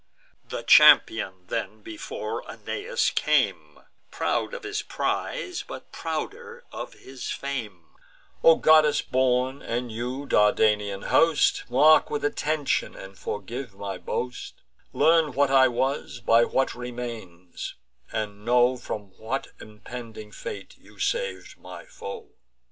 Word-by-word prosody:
The - - -6
champion, - - +6
then, - - -4
before 335 +9 -5
Aeneas 480 +4 -2
came, - - 0 0.3
Proud - - -1
of 485 - -8
his 415 +1 -3
prize, 415 -2 -3
but - - -10
prouder 470 +2 -5
of - - -7
his 130 -1 -8
fame: 110 -11 -5 0.6
"O 165 - +8
goddess 155 -2 +5
born, 130 +1 +1
and 120 0 -3
you, 125 +5 -4
Dardanian 105 -3 +2
host, 165 -2 +3
Mark 150 +5 +5
with 145 -1 -2
attention, 150 0 -1
and 95 0 -10
forgive 110 +4 -6
my 100 -1 -5
boast; 125 0 -5 0.3
Learn 160 -3 +3
what 140 +1 +2
I 135 -1 +6
was, 130 +1 -2
by 115 0 +4
what 135 - 0
remains; 115 -8 -7 0.4
and 105 -2 -4
know 125 +2 +3
From 105 -5 -6
what 115 +5 -3
impending 110 0 -10
fate 465 -4 -8
you - - -19
sav'd - - -3
my - - -10
foe." 465 -2 -9
125 Hz, 120 wpm, -26 LUFS, 110-155 Hz, 0.6 s, O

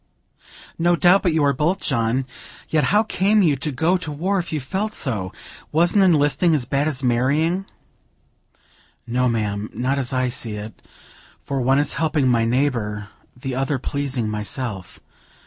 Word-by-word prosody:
"No 175 +1 +3
doubt 180 +3 +5
but 180 - +1
you 160 -1 +1
are 140 -1 +3
both, 155 +7 0
John; 120 0 0 0.4
yet 155 -2 +2
how 210 +1 +3
came 210 0 +2
you 155 -5 +3
to 150 +3 -3
go 165 +8 +1
to 175 -4 -6
war, 185 +7 -1
if 175 - -5
you 155 - -1
felt 195 +11 -3
so? 105 - -2 0.4
Wasn't 175 +6 +3
enlisting 155 -1 +3
as 135 -5 -1
bad 140 +4 0
as 140 -3 -1
marrying?" 145 +10 +1 1.4
"No, 125 +1 +1
ma'am, 105 -2 -2
not 135 +3 0
as 130 -3 -1
I 130 -1 +1
see 115 -2 -3
it, 105 +1 -8 0.6
for 135 -1 -2
one 135 +2 +3
is 145 - +1
helping 155 -4 +1
my 115 -2 +3
neighbor, 115 -5 -1 0.3
the 130 +1 -4
other 135 +2 -1
pleasing 135 -3 -2
myself. 105 -1 -4
140 Hz, 165 wpm, -21 LUFS, 120-165 Hz, 1.4 s, doubt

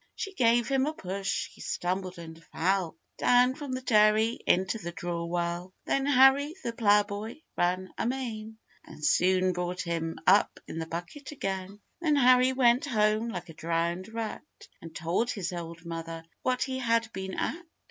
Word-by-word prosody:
She 395 - -5
gave 240 -6 +3
him 270 0 +1
a 305 - -1
push, 195 -1 -3
he - - -16
stumbled 185 0 -3
and 165 -1 -10
fell 180 -1 -1 0.2
Down 245 +1 +5
from 285 -1 -7
the 255 0 -4
dairy 215 0 +4
into 190 +5 +2
the 175 -4 -5
drawwell. 175 +1 -3
Then 275 0 0
Harry, 280 +3 +5
the 235 - -2
ploughboy, 210 +3 +1
ran 185 +1 0
amain, 225 -3 -3 0.3
And 150 - -8
soon 185 0 +3
brought 180 +1 -3
him 165 -1 -3
up 195 +3 +4
in 165 - -6
the 160 - -4
bucket 175 - -7
again. 195 -6 -4 0.2
Then 310 -3 +2
Harry 255 -1 +5
went 250 0 +3
home 215 -2 +1
like 175 -4 -6
a - - -9
drowned 170 +4 -2
rat, 225 -1 -4 0.4
And 165 -1 -11
told 175 +8 0
his 185 -5 -3
old 170 -1 -7
mother 165 -1 -6 0.2
what 255 0 +1
he 260 -1 -3
had 230 -2 +1
been 190 0 -5
at. 335 - -2
200 Hz, 165 wpm, -29 LUFS, 175-245 Hz, 0.4 s, Down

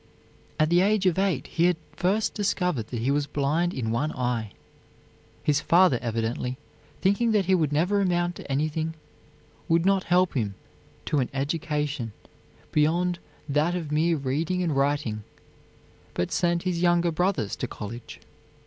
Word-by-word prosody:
At 155 +1 +3
the 175 +1 +5
age 200 0 +2
of 185 0 +3
eight 190 -8 +1
he 170 - +1
had 180 -2 +3 0.2
first 195 +7 +1
discovered 180 - 0
that 120 -2 -4
he 130 +4 +1
was 145 0 +1
blind 150 +5 0
in 115 -8 -2
one 145 +7 0
eye. 120 -4 -2 0.9
His 150 0 +2
father, 170 -8 +4
evidently 115 +2 -2 0.4
thinking 210 +4 +2
that 205 -3 +3
he 190 - +3
would 160 -5 +2
never 180 +7 +2
amount 175 -2 +1
to - - -8
anything, 155 +3 -1 0.7
would 165 +1 +3
not 195 -1 +3
help 180 +1 +3
him 105 -7 -1 0.5
to 150 - +1
an 125 - 0
education 150 -4 -2 0.6
beyond 170 +4 +2 0.3
that 150 +5 +1
of 160 -4 -4
mere 160 +2 +2
reading 155 +7 -1
and 160 -5 0
writing, 135 -6 0 0.9
but 90 - -1
sent 170 -1 +1
his 180 -2 -1
younger 175 -1 +3
brothers 160 - 0
to - - -3
college. 115 +3 -8
155 Hz, 155 wpm, -26 LUFS, 135-180 Hz, 0.9 s, the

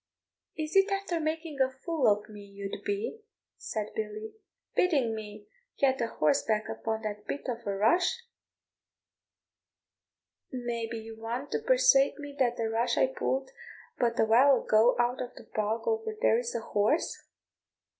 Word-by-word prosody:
"Is 310 +1 -4
it 390 +1 +5
after 390 -4 -1
making 315 -2 -2
a 260 - +4
fool 270 +3 -1
of 210 0 +2
me 210 -1 -11
you'd 200 0 -7
be," 410 +3 -3 0.3
said 215 -1 -5
Billy, 215 0 -5 0.4
"bidding 275 -11 +2
me 210 -1 -8 0.3
get 265 -2 +2
a 230 - +1
horseback 215 +5 +1
upon 220 0 -3
that 210 -1 -5
bit 285 - -4
of 235 -3 -4
a 200 - 0
rush? 350 - +2 2.3
May 240 -3 -3
be 230 0 -5
you 225 0 -9
want 240 +5 -4
to - - 0
persuade - - +4
me 290 -1 -8
that 245 -2 +2
the 230 -2 0
rush 235 +2 +1
I - - +5
pulled 265 0 -1 0.5
but 235 -1 +1
a - - +5
while 255 +5 +5
ago 220 +3 +4
out 240 +1 +1
of 245 - -6
the - - -11
bog 215 +1 -1
over 445 -1 -1
there 230 - +4
is 240 -1 -4
a 235 - -1
horse?" 220 +8 +1
240 Hz, 160 wpm, -29 LUFS, 220-305 Hz, 2.3 s, it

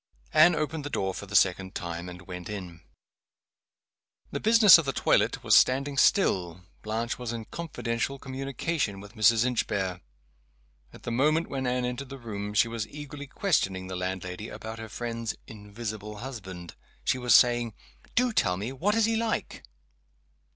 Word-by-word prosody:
Anne 175 -1 +7
opened 155 0 -2
the 145 - -4
door 95 -8 -1
for 100 - -7
the 95 - -6
second 95 0 +3
time, 85 +1 -5
and 90 0 -10
went 90 -1 -8
in. 90 -5 -7 1.5
The - - -3
business 220 -5 +8
of 165 - -2
the 135 - -1
toilet - - +2
was - - +5
standing 140 +2 +4
still. 90 - +2 0.2
Blanche 115 +3 -3
was 120 -2 -4
in 115 -2 -5
confidential 135 -5 -3
communication 135 -3 -3
with 100 +1 -12
Mrs. 110 +1 +4
Inchbare. 95 -7 -1 0.9
At - - -15
the 120 - -4
moment 155 +7 +2
when 130 -2 -2
Anne 125 0 0
entered 125 +2 -4
the 135 - -7
room 105 -4 -6
she 115 - +4
was 115 -2 -4
eagerly 145 +1 -8
questioning 100 - 0
the 95 0 -6
landlady 90 +2 -4
about 110 0 -7
her 110 0 -7
friend's 115 0 -4
"invisible 105 0 -7
husband" 95 -8 -8 0.3
she 130 - +1
was 125 -1 +3
just - - +10
saying, 120 -3 -1 0.4
"Do 250 0 +2
tell 90 - +2
me! 105 +6 -4
what 185 +11 0
is 225 -1 +4
he 225 0 +1
like?" 225 0 -2
115 Hz, 165 wpm, -28 LUFS, 100-135 Hz, 1.5 s, just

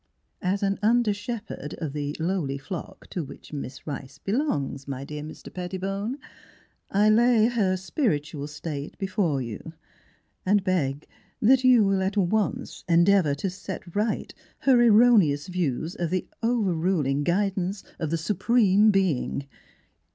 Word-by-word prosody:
As 195 +2 0
an 195 0 0
under 225 0 +3
shepherd 205 - -6
of 150 -4 -4
the 145 0 -3
lowly 160 -5 -1
flock 150 +5 -7
to 175 - -2
which 145 - -12
Miss 140 -2 -6
Rice 140 -2 -6
belongs, 150 - -2
my 135 -1 -4
dear 150 +1 -6
Mr. 155 +1 -10
Pettibone, 195 +6 -3 0.7
I 205 +2 +3
lay 230 0 +5
her 210 -6 +1
spiritual 155 - -2
state 150 -1 -6
before 185 -8 0
you, 115 -4 -7 0.7
and 200 +1 +3
beg 155 -7 -1 0.3
that 255 +4 +4
you 250 -3 +6
will 195 -1 +2
at 190 +2 -1
once 220 +6 0
en 170 0 +5
deavor 185 -8 +4
to 190 +7 -2
set 185 -2 -8
right 210 +1 -1 0.3
her 265 -2 +5
erro 235 +1 +7
neous 145 -2 0
views 170 -3 -2
of 170 -2 -2
the 185 +1 -1
overruling 180 - +1
guidance 195 +2 0 0.2
of 160 -3 -2
the 165 - 0
Supreme 210 +3 +3
Being. 185 -8 +1
185 Hz, 145 wpm, -26 LUFS, 150-210 Hz, 0.7 s, erro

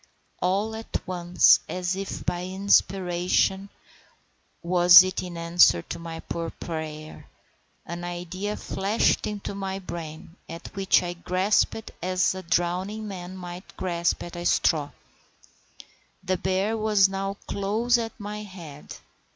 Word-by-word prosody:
All 200 +5 0
at 225 0 -4
once, 175 -1 +4
as 180 0 -2
if 195 0 -5
by 175 0 -2
inspiration—was 185 -1 +2
it 185 0 -2
in 180 -2 -7
answer 170 - +4
to 170 - -7
my 165 -1 -7
poor 165 -1 -4
prayer?—an 160 +2 -9
idea 180 +4 -4
flashed 200 +4 0
into 205 -1 -5
my 195 -1 -4
brain, 170 -2 -8
at 165 0 -9
which 195 -1 +3
I 175 0 -3
grasped 185 +5 0
as 185 0 +1
a 190 - -6
drowning 185 +5 -1
man 185 -1 -7
might 180 +1 -9
grasp 170 -2 -1
at 175 - -9
a 175 - -5
straw. 150 -4 +2 1.3
The 185 0 0
bear 190 +4 0
was 215 -3 +4
now 195 +1 -4
close 220 +5 +1
at 225 0 -5
my 210 0 -5
head. 170 -8 -10
185 Hz, 125 wpm, -26 LUFS, 175-195 Hz, 1.3 s, once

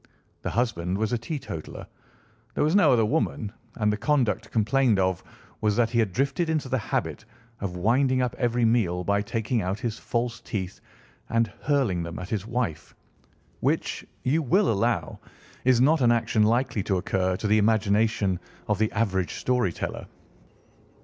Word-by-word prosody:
The - - -3
husband 95 -7 -1
was 110 +3 -1
a - - +2
teetotaler, 120 - -6 0.7
there - - +1
was 155 +5 +2
no 180 -8 +6
other 115 -3 +4
woman, 110 -5 -1 0.2
and 105 -2 +1
the - - -2
conduct 115 -3 +1
complained 115 +1 +2
of 95 -1 0 0.4
was 105 -1 +2
that 115 0 +2
he 120 - +1
had 110 -4 +2
drifted 140 - 0
into 155 -4 0
the 130 - +1
habit 110 - -3 0.4
of 95 -3 -4
winding 130 +7 +2
up 125 -1 0
every 120 -1 +2
meal 100 -6 +1
by 100 +2 +1
taking 115 +2 -1
out 95 +3 -2
his 115 -3 -3
false 120 0 -2
teeth 95 -5 -5 0.5
and 115 -2 +1
hurling 130 - +1
them 85 0 -5
at 90 +1 -7
his 105 -1 -3
wife, 115 -10 -3 0.6
which, - - -1 0.2
you 150 +6 +2
will 185 - +3
allow, 100 -3 0 0.5
is 130 -2 +5
not 150 +4 +4
an 120 -1 +5
action 115 -1 +1
likely 115 +1 +2
to 95 0 0
occur 95 0 0
to - - -6
the 105 +1 +4
imagination 105 -2 +2 0.3
of - - 0
the 110 0 +1
average 95 -5 0
story 125 -7 +1
teller. - - -5
115 Hz, 170 wpm, -26 LUFS, 100-125 Hz, 0.7 s, no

